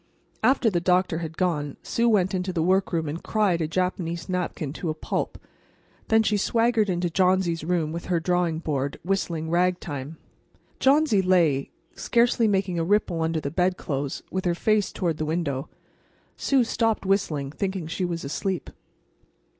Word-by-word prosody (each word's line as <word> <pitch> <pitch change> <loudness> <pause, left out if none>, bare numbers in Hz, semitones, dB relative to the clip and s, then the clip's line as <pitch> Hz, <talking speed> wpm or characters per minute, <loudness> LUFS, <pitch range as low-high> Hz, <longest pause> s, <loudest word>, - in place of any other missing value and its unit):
After 245 -1 +3
the 175 -2 0
doctor 180 -1 +2
had 160 -1 -6
gone 150 -6 -1
Sue 235 0 +1
went 190 -4 +2
into 185 0 -1
the 165 -3 0
workroom 180 -3 +1
and 155 +4 -4
cried 200 -6 +1
a 160 - 0
Japanese 170 0 -2
napkin 180 -6 -3
to 170 0 -4
a 155 - -2
pulp. - - -3 0.7
Then 220 0 +4
she 210 -1 +1
swaggered 225 0 +2
into 175 -1 0
Johnsy's 180 -2 +2
room 165 -2 0
with 170 +1 -5
her 175 -2 +1
drawing 175 -1 0
board, 140 -4 -2
whistling 170 -4 -1
ragtime. 165 -5 -1 0.6
Johnsy 275 -6 +4
lay, 170 -7 +2 0.2
scarcely 235 -1 +2
making 190 -4 0
a - - +1
ripple 180 -2 +1
under 160 0 0
the 140 -2 -4
bedclothes, 165 -6 -1
with 185 0 -2
her 175 -1 +1
face 215 +2 +1
toward 170 -4 -1
the - - -2
window. 150 -4 -2 0.7
Sue 270 -3 +2
stopped 225 -2 0
whistling, 155 -8 0
thinking 190 0 -3
she 165 +4 -3
was 170 -2 -2
asleep. 185 +6 -3
180 Hz, 160 wpm, -25 LUFS, 160-195 Hz, 0.7 s, Then